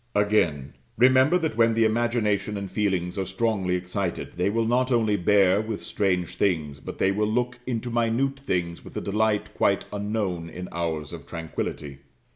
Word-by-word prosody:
Again. 85 -10 +1 0.2
Remember 130 +7 +5
that 160 -9 -2
when 115 0 +3
the 115 0 +4
imagination 110 -3 0
and 100 -1 -5
feelings 95 -3 -1
are 95 - -1
strongly 95 -2 0
excited, 90 0 -3
they 90 +2 +1
will 115 +2 0
not 125 +3 +1
only 110 -4 +3
bear 100 0 +4
with 110 -1 -5
strange 90 -4 -1
things, 75 -7 0
but - - -8
they 95 - +2
will 105 +2 0
look 125 +1 -1
into 120 -1 -2
minute 120 +4 0
things 85 -10 -2
with - - -9
a - - -2
delight 105 +1 0
quite - - +1
unknown 100 -5 -2
in 90 +1 -7
hours 80 -4 -3
of - - -9
tranquillity. 75 -4 -5
105 Hz, 170 wpm, -25 LUFS, 90-115 Hz, 0.2 s, Remember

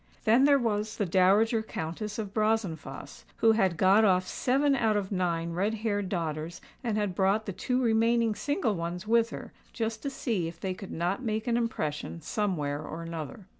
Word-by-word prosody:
Then 240 +5 +5
there 285 -1 +6
was 215 -4 -1
the 205 - 0
Dowager 200 +6 +3
Countess 205 +1 -5
of 205 -3 -5
Brazenphace, 195 -11 -2
who 225 - +5
had 190 -6 +2
"got 195 +4 +5
off" 185 -3 +3
seven 275 +6 +2
out 220 -4 +2
of 200 -1 -3
nine 170 -3 -1
red 200 +6 0
haired 205 -3 -2
daughters, 165 -2 -3 0.2
and 225 -3 -1
had 205 -3 0
brought 195 +4 +1
the 200 - -4
two 250 +7 -1
remaining 230 -1 +2
single 225 - -1
ones 170 +1 -4
with 230 +1 +3
her - - -8 0.2
just 225 -1 -3
to 280 - -2
see 230 -10 -2
if 165 - -9
they 190 -1 -2
could 190 +1 -9
not 175 +7 -1
make 220 -3 -2
an 240 -2 +1
impression 165 -10 -2
somewhere 155 -5 -2
or 165 +2 -6
another. 165 +4 -6
205 Hz, 185 wpm, -29 LUFS, 175-225 Hz, 0.2 s, there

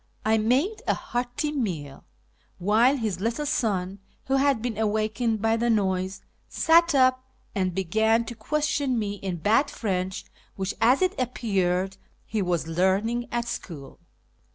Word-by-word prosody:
I 220 0 +3
made 265 - +1
a - - +3
hearty 245 +5 -3
meal, 175 - -4 0.5
while 225 +9 +3
his 215 -7 -2
little 230 +8 -1
son, 200 -10 -1 0.3
who 270 0 +1
had 275 -3 +3
been 235 0 -3
awakened 220 +1 0
by 225 0 +3
the 235 +1 0
noise, 190 -3 0 0.3
sat 335 -1 +4
up 255 -1 +4 0.3
and 185 -3 -1
began 220 +5 +2
to 235 - -6
question 285 +2 -1
me 205 -2 -2
in 190 -2 -4
bad 220 - +2
French, 190 -3 -3 0.3
which, 190 0 -2
as 255 +9 +4
it 370 +1 +2
appeared, 195 -6 0 0.3
he 215 -1 -2
was 175 -3 0
learning 195 +8 +1
at 240 0 -1
school. 150 - -7
220 Hz, 145 wpm, -26 LUFS, 190-250 Hz, 0.5 s, sat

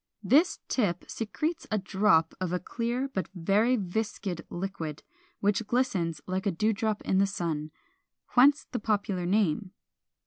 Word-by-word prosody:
This 290 - +4
tip 190 -9 0
secretes 305 +9 -3
a 215 - +1
drop 190 -4 +3
of 180 -2 -1
a 180 - 0
clear 240 +6 -2
but 195 -9 -3
very 205 +8 +3
viscid 200 -3 -3
liquid, 175 -5 -5 0.4
which 205 +2 +1
glistens 195 - 0
like 185 +2 -2
a - - +3
dew 215 +6 +1
drop 215 0 -1
in 190 - +2
the 200 - +4
sun; 160 -5 -3 0.6
whence 275 +4 +5
the 250 - -2
popular 200 -4 -1
name. 195 -1 +1
200 Hz, 145 wpm, -29 LUFS, 180-225 Hz, 0.6 s, whence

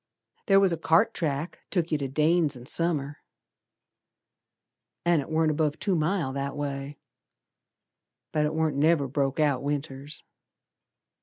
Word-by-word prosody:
Ther 195 -1 +6
was 195 -3 +3
a - - -2
cart 165 +8 +3
track 155 0 -3
took 175 -3 -1
yer 155 - +2
to 140 - -2
Dane's 155 +2 +2
in 125 -1 -11
Summer, 150 -2 -1 1.9
An' 170 -3 +3
it 140 - -9
warn't 160 0 +2
above 150 -1 0
two 195 - 0
mile 160 -3 0
that 140 +1 -3
way, 140 0 -4 1.3
But 150 -1 +1
it 155 - -4
warn't 160 -3 0
never 150 -1 +3
broke 135 +1 -1
out 145 -4 +2
Winters. 140 0 -4
150 Hz, 140 wpm, -27 LUFS, 140-165 Hz, 1.9 s, Ther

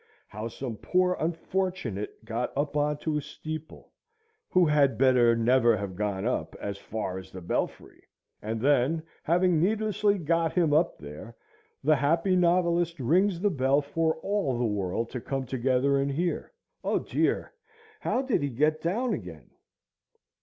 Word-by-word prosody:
how 105 +2 -5
some 115 -1 -6
poor 180 - +1
unfortunate 165 - -3
got 115 +2 -2
up 145 +1 -1
on 150 0 +1
to 155 0 -2
a - - -1
steeple, 155 +2 -8 0.6
who 180 -1 +4
had 145 -3 +3
better 125 -3 +5
never 115 0 +4
have 100 -2 -5
gone 100 0 -2
up 80 -10 -2
as 100 -1 -5
far 100 -3 -4
as 95 - -12
the 95 - -9
belfry; 85 - -3 0.4
and 110 +1 -3
then, 145 +5 +2 0.2
having 175 0 +2
needlessly 210 +1 +1
got 165 -1 0
him 165 -5 +2
up 165 +3 +2
there, 75 +11 -10 0.5
the 155 +2 +5
happy 165 +7 +2
novelist 170 -2 +2
rings 175 +8 +2
the 205 +2 +2
bell 135 -2 +2
for 160 +3 0
all 195 -11 0
the 120 - 0
world 105 +1 -1
to 125 - -4
come 135 +1 -3
together 130 +2 +1
and 140 +1 0
hear, 170 +5 -2 0.3
O - - +1
dear! - - -1 0.5
how 260 +2 -1
he 260 - +1
did 140 -5 -3
get 155 +2 +2
down 220 +9 0
again! 85 - -8
145 Hz, 155 wpm, -28 LUFS, 115-170 Hz, 0.6 s, better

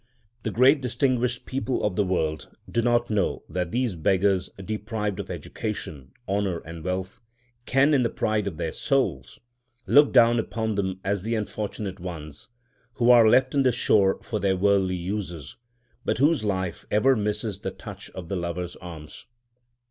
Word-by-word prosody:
The - - -2
great 130 +6 +4
distinguished 125 -1 0
people 135 -1 -2
of 105 -3 0
the 105 - +2
world 80 -6 -1 0.2
do 115 - 0
not 120 0 +1
know 105 -2 0
that 90 -2 -3
these 120 -5 0
beggars—deprived 100 +4 -1
of 100 - -5
education, 70 -5 -6 0.2
honour, 100 -3 0
and 80 0 -9
wealth—can, 120 - -2
in 135 - +4
the 120 - +1
pride 105 -2 -1
of 85 -6 -4
their 80 - -2
souls, 95 - -1 0.5
look 145 0 +6
down 120 -2 +5
upon 110 0 -2
them 95 -2 -2
as 100 -1 -1
the 115 +4 -1
unfortunate 105 -2 -4
ones, 80 -3 -8 0.4
who 120 0 +4
are 115 -2 +7
left 130 +3 +4
on 140 - +3
the 130 -1 +4
shore 100 -5 +3
for 110 - -3
their 95 -1 +1
worldly 95 -1 +2
uses, 90 -4 -5 0.5
but - - 0
whose 145 0 +3
life 95 -4 -2
ever 130 +6 +4
misses 105 -1 -1
the - - -3
touch - - -10
of 90 -3 -7
the 100 - -3
Lover's 85 0 -4
arms. 80 -4 -10
105 Hz, 160 wpm, -25 LUFS, 90-120 Hz, 0.5 s, are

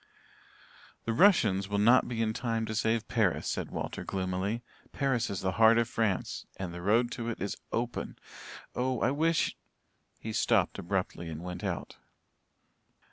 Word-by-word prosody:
"The 115 - 0
Russians 110 - +4
will 100 - 0
not 120 +5 +5
be 115 -2 -1
in 110 -1 0
time 115 -1 -1
to 110 - -4
save 110 +1 +1
Paris," 110 -6 +1
said - - -2
Walter - - -4
gloomily. 95 +4 -2 0.3
"Paris 130 -5 0
is 100 - -3
the 95 - 0
heart 110 +1 +8
of 115 -1 +2
France 110 -5 -1
and 90 -3 -4
the 90 - -6
road 115 +6 +3
to 115 0 -3
it 115 - -4
is 100 +2 -2 0.2
open. 120 +1 -3 0.6
Oh, 125 -1 0
I 125 - +3
wish" 160 +3 +1 0.6
he 110 - -5
stopped - - +2
abruptly 90 -2 -2
and 80 +1 -6
went 90 0 -6
out. - - -4
110 Hz, 160 wpm, -30 LUFS, 95-120 Hz, 0.6 s, heart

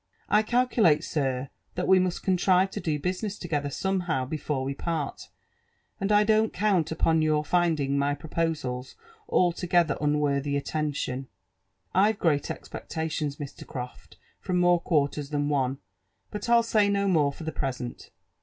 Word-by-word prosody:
••I 210 +1 +5
calculate, 220 -9 +3
sir, 135 -4 -2 0.2
that 180 - -2
We 190 0 +6
must 180 -1 -1
contrive 185 0 +3
to - - -4
do 155 -3 -1
business 185 +6 -3
together 150 -5 -2
somehow 175 -5 -1
before 145 -1 -3
we 135 +1 -2
part, 155 -1 -4 0.7
and 195 +1 -1
I 210 0 +6
don't 220 +1 +3
count 180 -5 +1
upon 160 0 +2
your 155 -1 +1
finding 155 -5 +1
my 145 +1 +1
pro 145 +3 -11
posals 145 -6 -2 0.3
altogether 175 -2 +2
unworthy 145 -1 +1
attention. 140 -3 -2 0.7
I've 205 +3 +3
great 150 -6 +1
expectations, 155 -3 -4
Mr. 145 -2 -8
Croft, 125 -1 -8 0.2
from 180 - -1
more 175 -1 +4
quarters 145 -3 0
than 145 -1 -1
one, 135 -2 0 0.5
but 210 +2 -5
I'll 235 0 +5
say 215 -3 +3
no 200 0 +1
more 155 -6 +3
fpr 160 +3 -10
the 160 - -2
present. 130 -4 -4
160 Hz, 150 wpm, -27 LUFS, 140-185 Hz, 0.7 s, We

